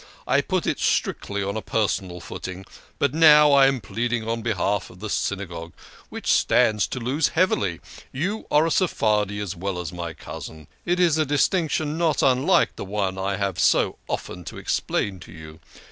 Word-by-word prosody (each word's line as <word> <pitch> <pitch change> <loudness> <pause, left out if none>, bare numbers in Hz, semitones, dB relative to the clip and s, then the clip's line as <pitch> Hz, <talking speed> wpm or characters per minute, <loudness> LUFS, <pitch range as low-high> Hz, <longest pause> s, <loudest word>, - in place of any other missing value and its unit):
I - - +3
put - - -1
it - - -1
strictly 100 0 -1
on 100 +1 -3
a 110 - -2
personal 95 -5 -1
footing. 95 +4 -7 0.3
But 140 -2 +1
now 150 -2 +7
I 140 -1 +6
am 135 -1 +1
pleading 115 +3 -3
on 115 0 -2
behalf 105 -2 -1
of 90 - -15
the 105 +1 -5
Synagogue, 85 -4 -3 0.4
which - - -2
stands 105 -3 +3
to 130 - -5
lose 135 +6 +1
heavily. 105 - 0 0.3
You 190 +11 -3
are 150 +2 +4
a 165 - 0
Seph 185 -4 0
ardi 105 -2 +2
as 100 -2 -4
well 95 +1 -3
as 90 -1 -5
my 85 -2 -5
cousin. 80 0 -9 0.2
It 175 +1 +1
is 165 -3 +3
a - - +4
distinction 155 +1 0
not 165 -2 +1
unlike 130 -1 +3
the - - -5
one 95 -1 -2
I 95 +1 -1
have 100 -3 -2
so - - +2
often 90 - -5
to - - -8
explain 95 -2 -2
to - - -13
you. 80 -1 -11
105 Hz, 185 wpm, -24 LUFS, 95-145 Hz, 0.4 s, now